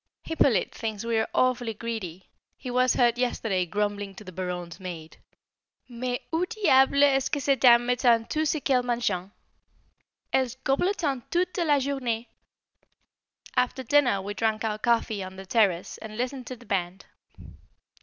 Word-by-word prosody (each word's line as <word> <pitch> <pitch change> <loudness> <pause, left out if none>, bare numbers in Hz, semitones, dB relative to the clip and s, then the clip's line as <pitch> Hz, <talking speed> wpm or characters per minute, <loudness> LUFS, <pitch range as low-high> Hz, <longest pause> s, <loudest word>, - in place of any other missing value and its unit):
Hippolyte 280 -8 +1
thinks 220 -1 -4
we 230 -1 +1
are 220 - -1
awfully 245 -3 +1
greedy; 200 -6 -6 0.3
he 255 - -6
was 255 0 +3
heard 240 -1 +3
yesterday 215 -7 0
grumbling 205 +1 -2
to 215 - -10
the 185 - -10
Baronne's 180 -1 -5
maid, 170 -4 -8 0.7
"Mais 245 0 -3 0.2
où 350 +3 0
diable 280 -9 +4
est 270 -2 +4
ce - - -1
que 290 - -1
ces 275 0 +2
dames 240 -2 +6
mettent 240 -2 +2
tout 310 0 0
ce 310 - 0
qu'elles 265 -3 +2
mangent? 235 -7 -1 1.0
Elles 260 -2 +1
goblottent 280 - 0
toute 355 0 0
la 305 -4 +3
journée!" 255 -4 -2 1.3
After 250 +1 0
dinner 245 -7 +3
we 205 +1 -4
drank 220 +1 -1
our 215 -1 -2
coffee 225 -3 +1
on 185 0 -8
the 190 0 -9
terrace 190 -4 +1
and 215 -1 -9
listened 255 0 -3
to 255 - -5
the 240 0 -17
band. 190 -2 -3
235 Hz, 155 wpm, -26 LUFS, 205-265 Hz, 1.3 s, dames